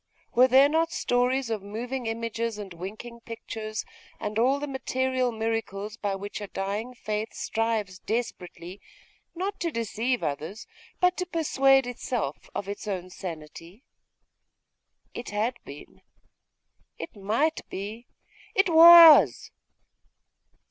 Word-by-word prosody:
Were 250 +2 +6
there 265 +2 +6
not 320 +2 +1
stories 245 0 0
of 215 -3 -2
moving 235 +5 -5
images, 230 0 -3
and 200 -3 -8
winking 215 +7 -8
pictures, 225 -2 -6 0.3
and 210 +1 -3
all 265 +4 +3
the 290 - -3
material 260 -2 -1
miracles 220 -2 -3
by 205 -3 -2
which 205 +2 -7
a 205 - -5
dying 205 +6 -4
faith 215 -1 -4
strives 220 -5 -2
desperately 185 -5 -5 0.5
not 380 +4 -4
to 340 - -1
deceive 230 -1 -2
others 155 +9 -4 0.3
but 360 0 +2
to 365 - -3
persuade 270 -6 +3
itself 245 - -4
of 200 - -4
its 205 +1 -6
own 185 -2 -4
sanity? 170 - -9 1.3
It 240 - -7
had 220 +4 -1
been 140 +1 -12 1.0
it 165 - -8
might 225 +11 0
be 215 +5 -7 0.5
it 385 -1 +3
was 325 - +8
225 Hz, 120 wpm, -26 LUFS, 200-260 Hz, 1.3 s, was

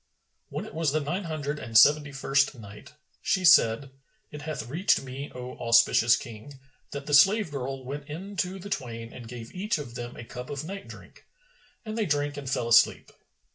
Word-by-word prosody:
When - - -5
it - - -11
was 160 -2 0
the 155 - +2
Nine 175 +7 -3
Hundred 150 -2 -3
and 115 -1 0
Seventy 145 +5 +6
first 135 0 +1
Night, 105 +4 -12 0.3
She 185 -1 0
said, 130 -3 +5 0.4
It 150 - -8
hath 150 -7 -5
reached 165 +7 +1
me, 135 +2 -7
O 125 0 -7
auspicious 115 0 +5
King, 120 +4 -9 0.3
that 140 0 -6
the 145 - -4
slave 195 +5 +5
girl 135 -1 -5
went 140 +2 -6
in 190 +7 -7
to 185 +1 -1
the 200 +2 -9
twain 115 - -5
and 120 -2 -10
gave 115 -1 -9
each 205 +3 -1
of 140 -6 -7
them 120 0 -7
a - - -8
cup 125 +2 -8
of 145 0 -4
night 195 +4 -7
drink, - - -14 0.6
and 215 0 -5
they 220 -2 0
drank 145 -1 0
and 140 -2 -6
fell 120 -3 -1
asleep. 115 0 +4
140 Hz, 195 wpm, -27 LUFS, 125-155 Hz, 0.6 s, Seventy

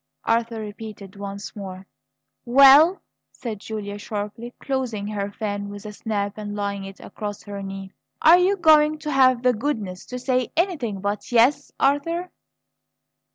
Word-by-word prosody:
Arthur 230 0 0
repeated 210 -2 -8
once 200 0 -7
more. 190 -2 -8 0.6
"Well?" 275 +8 +7 0.3
said 225 -5 -6
Julia 205 -1 -6
sharply, 210 +3 -5
closing 255 -7 -2
her 205 -1 -3
fan 205 -1 -4
with 205 +1 -9
a 210 - -7
snap 205 -1 -3
and 205 -1 -5
laying 200 -1 -3
it 195 0 -10
across 205 -2 -7
her 200 -1 -7
knee. 195 0 -7 0.3
"Are 335 +3 +7
you 385 +3 +2
going 310 -2 +5
to 300 0 -5
have 255 -3 +4
the 250 0 +4
goodness 215 -7 -3
to 250 - -5
say 255 -1 0
anything 290 - -1
but 205 +4 -3
'Yes,' 250 +5 +3
Arthur?" 330 +6 +1
220 Hz, 150 wpm, -23 LUFS, 205-270 Hz, 0.6 s, Well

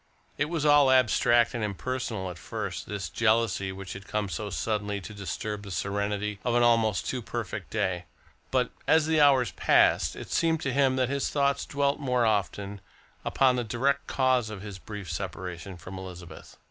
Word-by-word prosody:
It 145 - +1
was 165 -3 -1
all 145 -2 +6
abstract 120 -2 +4
and 120 -3 -2
impersonal 105 -2 -3
at 85 - -11
first, 105 -5 -5
this 100 -2 -3
jealousy 110 -4 +1
which 95 0 -7
had 100 0 -10
come 105 -2 -2
so 100 +5 -4
suddenly 105 +3 -2
to 105 +3 -9
disturb 105 +1 -4
the 100 - -9
serenity 100 +2 -2
of 120 -1 0
an 120 - +4
almost 115 -4 +3
too 130 - -2
perfect 115 -3 -5
day, 90 -1 -1 0.4
but - - +1 0.2
as 160 -1 +5
the 160 -1 +3
hours 135 -7 +5
passed - - +3
it - - -9
seemed 165 -1 +2
to 130 - -1
him 135 -1 +3
that 130 -1 +1
his 140 0 -1
thoughts 140 -1 +1
dwelt 140 0 0
more 125 -4 +1
often 100 -2 -1 0.4
upon 130 -2 +3
the 120 - 0
direct 135 +5 0
cause 130 -4 +2
of 105 -2 -7
his 100 -3 -8
brief 105 -2 -8
separation 90 0 -5
from 90 +3 -8
Elizabeth. 90 -2 -10
110 Hz, 180 wpm, -28 LUFS, 100-130 Hz, 0.4 s, all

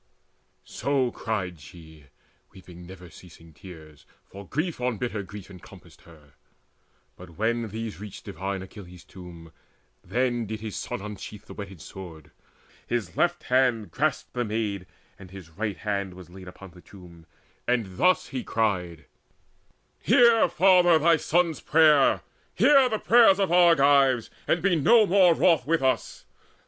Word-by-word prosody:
So 135 -3 -1
cried 95 -8 -4
she, 80 0 -15 0.5
weeping 90 -2 -14
never 90 -2 -13
ceasing 85 -2 -16
tears, 80 -3 -14 0.2
For 100 0 -13
grief 155 -1 -3
on 125 -3 -1
bitter 110 -2 -4
grief 100 0 -11
encompassed 90 -2 -16
her. 75 -3 -19 0.8
But 90 -3 -15
when 115 +2 -1
these 110 -3 -7
reached 105 -1 -10
divine 95 -1 -5
Achilles' 90 -2 -13
tomb, 85 -3 -13 0.5
Then 120 +3 -2
did 110 +1 -6
his 110 -1 -7
son - - -5
unsheathe 105 0 -9
the - - -12
whetted 95 -5 -10
sword, 85 -5 -11 0.6
His 105 -8 -3
left 175 -1 0
hand 125 -7 0
grasped 150 - -2
the 125 - -2
maid, 105 -4 -4 0.3
and 95 -2 -13
his 90 -3 -13
right 105 +4 -4
hand 100 -3 -4
Was 90 -2 -14
laid 95 0 -12
upon 95 +1 -12
the 90 +1 -17
tomb, 85 -4 -16 0.4
and 115 -7 -2
thus 185 +1 +2
he 130 -3 -5
cried: 90 -7 -2 0.9
"Hear, 235 -2 +4
father, 180 -3 +4
thy 165 +1 +3
son's 170 0 0
prayer, 155 -3 +3 0.3
hear 265 +9 +4
all 265 -2 +5
the 220 - -1
prayers 225 -3 +4
Of 195 -3 0
Argives, 140 -8 +4 0.2
and 170 - 0
be 195 -2 +2
no 215 +9 +4
more 185 -3 +4
wroth 160 -8 +2
with 165 -3 0
us! 130 -1 -2
105 Hz, 150 wpm, -25 LUFS, 90-150 Hz, 0.9 s, all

